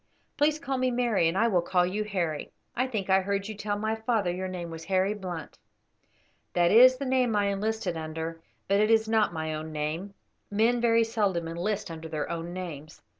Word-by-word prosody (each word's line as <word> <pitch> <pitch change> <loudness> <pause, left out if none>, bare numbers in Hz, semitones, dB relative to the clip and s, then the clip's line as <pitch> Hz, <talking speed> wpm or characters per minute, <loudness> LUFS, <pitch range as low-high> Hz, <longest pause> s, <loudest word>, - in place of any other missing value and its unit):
Please 300 +1 +2
call 270 -3 -3
me 255 0 +2
Mary, 240 -8 +2
and 165 +3 0
I 230 +3 +4
will 185 -6 +2
call 180 +1 +2
you 200 +4 -1
Harry. 175 -7 -3 0.2
I 255 +2 +1
think 215 -7 -3
I 190 0 +4
heard 200 +1 -2
you 220 - -5
tell 205 0 -3
my 220 +1 -1
father 220 -4 0
your 185 +1 -3
name 175 -2 -5
was 165 0 -8
Harry 190 +2 +1
Blunt." 180 -5 -7 0.9
"That 175 -1 +3
is 255 +3 +8
the 275 - -4
name 255 -3 +2
I 205 -1 +2
enlisted 200 -2 -2
under, 160 +1 -5 0.3
it 205 +2 +3
is 225 -1 +4
not 220 -3 +2
my 160 -1 -3
own 155 +1 -5
name; 155 +6 -3 0.3
men 230 +4 +2
very 230 -1 +4
seldom 205 -7 0
enlist 175 +3 -3
under 160 0 -7
their 155 -2 -3
own 170 0 -4
names." 160 -5 -7
195 Hz, 200 wpm, -28 LUFS, 170-220 Hz, 0.9 s, is